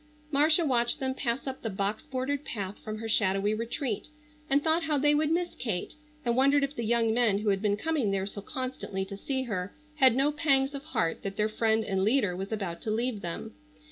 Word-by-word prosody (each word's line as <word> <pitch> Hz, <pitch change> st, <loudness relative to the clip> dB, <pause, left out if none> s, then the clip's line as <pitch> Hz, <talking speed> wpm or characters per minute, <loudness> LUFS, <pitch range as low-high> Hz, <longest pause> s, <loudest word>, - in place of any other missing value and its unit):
Marcia 310 Hz, +4 st, +5 dB
watched 240 Hz, -4 st, +2 dB
them 265 Hz, -1 st, -1 dB
pass 255 Hz, -1 st, -2 dB
up 265 Hz, -1 st, -5 dB
the 225 Hz, -, -2 dB
box 200 Hz, +1 st, -1 dB
bordered 265 Hz, +2 st, -2 dB
path 200 Hz, -6 st, -5 dB
from 215 Hz, 0 st, -6 dB
her 225 Hz, +1 st, -5 dB
shadowy 200 Hz, -1 st, +2 dB
retreat, 230 Hz, +1 st, -3 dB, 0.4 s
and 280 Hz, +1 st, +3 dB
thought 320 Hz, +1 st, +2 dB
how 305 Hz, -2 st, +1 dB
they 295 Hz, +2 st, +4 dB
would 300 Hz, +1 st, +2 dB
miss 345 Hz, +2 st, 0 dB
Kate, 200 Hz, -8 st, -3 dB, 0.3 s
and 235 Hz, -1 st, +2 dB
wondered 275 Hz, +2 st, +4 dB
if 280 Hz, +1 st, -2 dB
the 235 Hz, -, -3 dB
young 230 Hz, 0 st, +3 dB
men 230 Hz, -4 st, +3 dB
who 210 Hz, +1 st, 0 dB
had 195 Hz, -1 st, +1 dB
been 205 Hz, -1 st, +1 dB
coming 305 Hz, -5 st, 0 dB
there 195 Hz, -1 st, 0 dB
so 200 Hz, 0 st, -6 dB
constantly 255 Hz, -5 st, -4 dB
to 200 Hz, +1 st, -7 dB
see 260 Hz, +6 st, -2 dB
her 200 Hz, -6 st, -4 dB, 0.2 s
had 260 Hz, -4 st, +6 dB
no 275 Hz, +3 st, +3 dB
pangs 280 Hz, -2 st, +2 dB
of 280 Hz, 0 st, -6 dB
heart 165 Hz, -1 st, -1 dB
that 195 Hz, 0 st, -5 dB
their 210 Hz, 0 st, +2 dB
friend 220 Hz, 0 st, +1 dB
and 190 Hz, -2 st, 0 dB
leader 210 Hz, -4 st, +2 dB
was 195 Hz, +3 st, -5 dB
about 195 Hz, -6 st, -3 dB
to -, -, -4 dB
leave 225 Hz, 0 st, -1 dB
them. 170 Hz, -2 st, -5 dB
235 Hz, 220 wpm, -29 LUFS, 205-275 Hz, 0.4 s, had